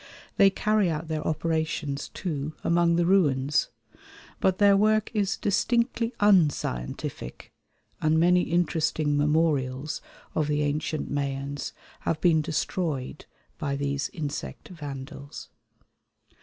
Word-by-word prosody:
They 200 -1 +7
carry 210 -1 +1
out 160 0 -3
their 155 -1 -1
operations, 160 -2 -1
too, 155 -5 -4
among 170 0 +3
the 170 0 +2
ruins; 145 -7 +2 0.7
but 185 -1 +2
their 200 -1 +6
work 215 +1 +3
is 205 -2 0
distinctly 235 +3 +1
unscientific, 145 - 0 0.5
and 155 +1 +3
many 180 +2 +5
interesting 160 -4 +1
memorials 145 -2 +1 0.3
of 155 -2 0
the 150 0 +1
ancient 150 +1 -2
Mayans 140 0 -3 0.3
have 160 - -1
been 160 -2 +4
destroyed 155 -3 -2 0.3
by 140 -4 -1
these 140 0 -2
insect 150 -3 -5
vandals. 145 -3 -8
155 Hz, 110 wpm, -27 LUFS, 145-180 Hz, 0.7 s, They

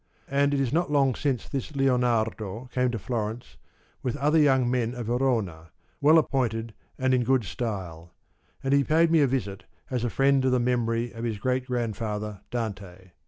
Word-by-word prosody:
And 140 +1 +3
it 140 - +1
is 135 -2 0
not 170 -1 +1
long 135 -3 +3
since 135 -2 -2
this 140 +2 -4
Lionardo 120 -3 0
came 125 0 +1
to 120 - -2
Florence 115 +1 -4 0.4
with 130 +2 -2
other 150 +3 +3
young 135 -4 +4
men 120 -1 0
of 120 -2 -5
Verona, 110 -10 -1 0.3
well 155 +3 +6
appointed 115 -7 0 0.2
and 130 0 +1
in 125 -1 +3
good 130 0 +2
style; 85 -2 -5 0.5
and 135 +1 +1
he 140 0 +4
paid 165 +3 +3
me 165 -2 +5
a 140 - +4
visit 110 -7 -3 0.3
as 125 -2 -1
a 120 - 0
friend 135 +2 +3
of 130 - +2
the 125 - +3
memory 120 -1 0
of 115 0 -7
his 115 -3 -2
great 130 +4 -1
grandfather, 105 -4 -3
Dante. 100 -6 -5
125 Hz, 180 wpm, -26 LUFS, 110-135 Hz, 0.5 s, well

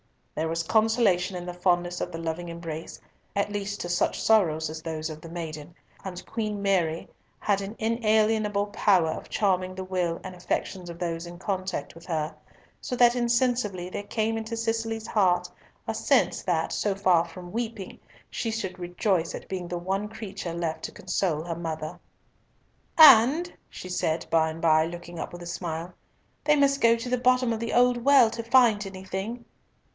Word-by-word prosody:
There 160 +1 -1
was 165 0 -1
consolation 215 -3 +2
in 175 0 -5
the 180 - -5
fondness 175 0 0
of 180 - -3
the 165 - -5
loving 165 +1 -4
embrace, 165 -1 -7 0.4
at 200 +1 0
least 205 0 -3
to 175 - -4
such 175 - +1
sorrows 160 -8 +3
as 155 0 -6
those 160 -1 -4
of 155 0 -9
the 165 - -10
maiden; 160 -1 -7 0.3
and 180 -2 -7
Queen 215 -2 -3
Mary 180 -5 0 0.3
had 200 -1 0
an 200 +3 -6
inalienable 220 -2 +2
power 190 -5 +3
of - - -7
charming 185 -2 0
the 190 - -5
will 180 -3 -1
and 185 - -7
affections 180 0 -3
of 170 - -8
those 170 -1 -3
in 175 0 -9
contact 190 0 -3
with 165 0 -14
her, 155 -3 -2 0.5
so 250 - -4
that 240 -1 +6
insensibly 235 -6 +1
there - - -3
came 220 +2 -1
into 225 +1 -4
Cicely's 225 -1 -2
heart 185 -5 +2 0.4
a - - -1
sense - - +2
that, - - 0
so 205 -2 0
far 185 -4 +4
from 175 +1 -10
weeping, 225 -3 -5 0.3
she 230 - -2
should 190 -5 -4
rejoice 175 0 0
at - - -9
being 185 -2 -4
the 175 0 -3
one 190 +4 -2
creature 200 -5 -6
left 170 -2 -3
to - - -6
console 160 -5 -1
her 170 -1 -4
mother. 160 -2 -5 1.0
"And," 300 +3 +8 0.2
she 185 - -9
said 160 -2 -1
by 160 -1 +3
and 160 +1 -7
by, 160 -1 +4
looking 175 0 -8
up - - -5
with 175 0 -9
a - - -8
smile, 170 0 -4 0.5
"they 300 - +4
must 275 -1 +3
go 230 0 +6
to 235 +2 -5
the 250 0 +1
bottom 250 -1 +3
of 220 - -3
the 230 0 -3
old 245 -1 +3
well 265 -4 +6
to 230 0 -4
find 230 -4 +4
anything." 190 +5 -6
190 Hz, 180 wpm, -27 LUFS, 170-225 Hz, 1.0 s, And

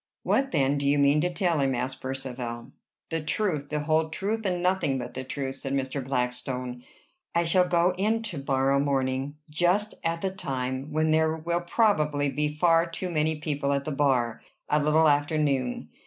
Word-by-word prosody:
"What, 270 0 +1
then, 140 - +1
do 140 - -1
you 145 +1 +3
mean 140 +1 +4
to 180 +2 0
tell 175 -4 +1
him?" 135 -2 +1
asked 130 +2 -3
Percivale. 125 -3 -5 0.4
"The 165 0 -1
truth, 150 -2 -1
the 150 -1 -1
whole 160 +1 +1
truth, 205 +6 -2
and 180 -1 -1
nothing 180 -7 +1
but 125 - -6
the 130 - -4
truth," 135 0 -4
said 135 0 -4
Mr. 135 0 -2
Blackstone. 125 -1 -3 0.5
"I 170 - +3
shall 180 +2 +3
go 175 +1 +3
in 220 +3 +1
to 170 -11 -4
morrow 135 0 +2
morning, 135 0 0
just 175 +7 +1
at 165 0 -1
the 190 - -1
time 130 -5 -4
when 155 +1 +1
there 160 0 +3
will 170 +2 -1
probably 150 -8 +1
be 150 +3 0
far 165 +2 +3
too 180 +2 -4
many 155 0 +1
people 145 -2 -1
at 140 0 -1
the 155 - -2
bar, 125 -5 +1 0.3
a 150 0 +3
little 155 +2 +4
after 145 +1 +2
noon. 135 -5 0
150 Hz, 185 wpm, -27 LUFS, 135-165 Hz, 0.5 s, mean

